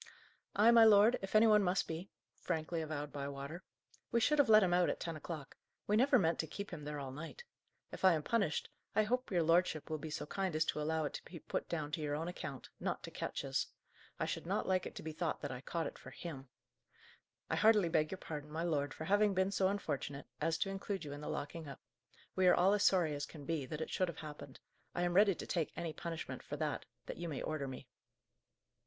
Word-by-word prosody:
"I, 220 +3 +7
my 230 -1 +8
lord, 220 +2 +7
if 195 +2 -5
any 215 +1 +8
one 210 -1 +6
must 185 0 +1
be," 165 +4 -5 0.2
frankly 165 -1 -2
avowed 150 -2 -4
Bywater. 140 +4 -5 0.5
"We 235 - +3
should 300 +6 +3
have 285 - +5
let 215 -1 +8
him 180 -2 +2
out 180 0 +4
at - - -2
ten 165 -2 -4
o'clock. 155 -2 -7 0.3
We 210 - +2
never 255 +4 +5
meant 170 -6 +2
to 160 - -1
keep 200 +6 -6
him 150 -4 -6
there 150 0 -4
all 135 -2 -5
night. 165 - -8 0.5
If - - -8
I 190 -2 +7
am 155 -2 -1
punished, 200 -8 +1 0.3
I 215 - +5
hope 250 +4 0
your 175 -4 +2
lordship 165 -1 +2
will 155 - -1
be 155 - -6
so 150 - -4
kind 190 +1 -2
as 155 0 +2
allow 155 +1 0
it 145 - -3
to - - -6
be 175 - -9
put - - -4
down 155 -3 -2
to 155 - -2
your 145 -1 -1
own 160 +3 -3
account, 155 -7 -6
not - - -2
to - - -7
Ketch's. - - -2 0.5
I - - +1
should - - -4
not - - 0
like 185 -1 +1
it - - -10
to - - -7
be 160 - -4
thought 160 +1 -2
that - - -3
I 125 -1 -6
caught 165 +4 -2
it - - -6
for - - -10
him. 135 -6 -8 1.0
I - - 0
heartily 215 -4 +5
beg 155 -2 +2
your 190 - -4
pardon, 150 -4 -6
my 160 +2 -3
lord, 145 -5 0
for 160 - -5
having 205 +2 +3
been 190 +1 +2
so 190 -1 +2
unfortunate 145 -7 -3 0.2
as 165 0 +1
to 195 - -1
include 195 -2 -4
you 145 - -5
in 145 - -7
the - - -5
locking 155 +2 -4
up. 140 - -8 0.6
We 185 -1 +4
are 180 - +7
all 190 +3 +4
as 205 - +2
sorry 175 -7 +4
as 145 -1 -3
can 150 -3 -10
be, 155 -4 -2
that 155 +2 -5
it - - -4
should 185 - +1
have 170 - -6
happened. 150 -3 -9 0.4
I 175 - 0
am 175 0 +1
ready 200 0 +6
to - - -6
take 165 -4 -1
any 165 -1 -3
punishment, 165 -1 -5
for - - -6
that, - - -2 0.2
that - - -6
you 170 0 -4
may 145 - -4
order 155 -3 -2
me." 130 +1 -7
165 Hz, 240 wpm, -36 LUFS, 150-195 Hz, 1.0 s, my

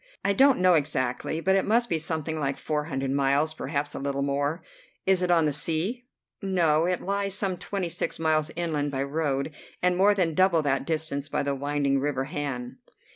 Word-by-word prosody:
"I 200 - +3
don't 270 +5 +5
know 180 0 +4
exactly, 145 0 0
but 190 +2 +3
it 195 - +3
must 235 +3 +2
be 165 -6 0
something 160 0 -3
like 140 -2 -1
four 150 -1 -2
hundred 135 -3 -2
miles, 140 +3 +2
perhaps 145 -2 -3
a - - -5
little 140 0 -2
more." 145 +4 -1 0.4
"It 190 - +3
is 185 -1 +3
on 170 -2 +4
the 150 - +1
sea?" 175 - 0 0.3
"No. 170 -5 +2
It 180 -1 -1
lies 200 0 -1
some 195 -2 -1
twenty 190 0 -3
six 170 - -2
miles 155 -1 +1
inland 155 -4 -1
by 135 -1 -2
road, 140 0 -2 0.3
and 180 0 +2
more 200 +3 +4
than 175 -5 +1
double 175 -2 +3
that 140 -1 0
distance 155 -3 -2
by - - -1
the 140 0 -1
winding 140 0 0
river 135 -1 -1
Han." 135 -5 -5
155 Hz, 195 wpm, -26 LUFS, 140-180 Hz, 0.4 s, don't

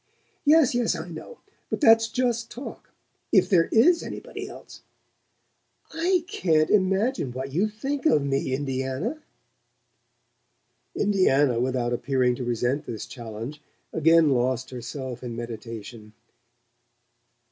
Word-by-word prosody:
"Yes, 300 -3 +5
yes: 240 -2 +1
I 165 +2 -6
know. 310 - -10 0.3
But - - -2
that's 225 -5 +6
just 235 -1 -1
talk. 255 +4 -9 0.4
If - - +5
there 175 -5 +4
IS 335 +10 +5
anybody - - -7
else - - -12 0.6
" - - -47 0.3
"I 345 +2 +1
can't 165 - +1
imagine 195 - +1
what 130 +2 -5
you 190 +7 +2
think 270 +8 -2
of 150 - +3
me, 135 -1 -1
Indiana!" 135 - -2 1.7
Indiana, 145 - +3
without 125 -1 0
appearing 125 0 +1
to 130 - -4
resent 120 +5 -1
this 115 -3 -5
challenge, 120 +4 -8 0.3
again 165 0 +5
lost 130 0 0
herself 125 0 -6
in 120 -2 -5
meditation. 115 -2 -8
145 Hz, 120 wpm, -25 LUFS, -, 1.7 s, that's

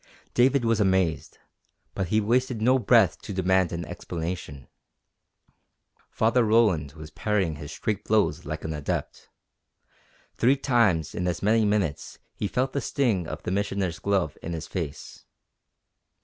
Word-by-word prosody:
David 130 0 +3
was 115 -1 +2
amazed, 95 -5 +1 0.6
but 95 - -2
he 110 +5 +2
wasted 120 +2 +1
no 130 +4 +3
breath 120 -1 +4
to - - -7
demand 95 -1 +2
an 85 0 -4
explanation. 80 -4 -6 1.4
Father 115 +2 +2
Roland 105 -10 +2
was 80 -1 -11
parrying 95 -8 -1
his 75 0 -8
straight 105 +4 -3
blows 110 -1 +1
like - - -5
an 80 - -3
adept. 75 -1 -4 1.1
Three 130 +4 +3
times 105 - +2
in 90 - -2
as 90 - -2
many 110 +2 +3
minutes 100 -8 -1 0.2
he 105 - -3
felt 130 +5 -1
the 140 - -1
sting 110 - 0
of - - -7
the - - -3
Missioner's 95 -3 -1
glove 95 -6 -1
in 85 - -5
his 80 -1 -5
face. 80 -7 -6
100 Hz, 145 wpm, -26 LUFS, 85-115 Hz, 1.4 s, breath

